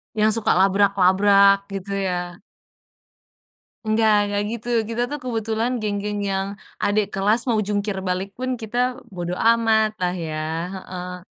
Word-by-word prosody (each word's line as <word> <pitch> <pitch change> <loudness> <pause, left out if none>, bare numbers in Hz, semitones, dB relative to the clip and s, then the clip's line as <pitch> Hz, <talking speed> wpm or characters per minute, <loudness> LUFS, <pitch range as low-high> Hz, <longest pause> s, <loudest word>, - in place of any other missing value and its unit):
Yang 215 +1 +3
suka - - +1
labrak-labrak 195 +1 +4
gitu, 195 +1 -5 0.2
ya? 175 -1 -4 1.5
Enggak 220 0 +3
enggak 205 0 -1
gitu. 235 0 -6 0.2
Kita 235 +1 -2
tuh 295 - -3
kebetulan 225 0 -1
geng-geng 205 0 -2
yang 195 0 -1 0.3
adek 205 +1 +2
kelas 205 +4 +2
mau 220 -2 +2
jungkir 205 -1 -1
balik 185 +2 -2
pun 255 0 -3
kita 220 +2 -5 0.4
bodo 175 -1 -4
amatlah 220 -5 +2
ya 155 -1 -4 0.4
heeh. 180 -1 -7
205 Hz, 125 wpm, -22 LUFS, 190-220 Hz, 1.5 s, labrak-labrak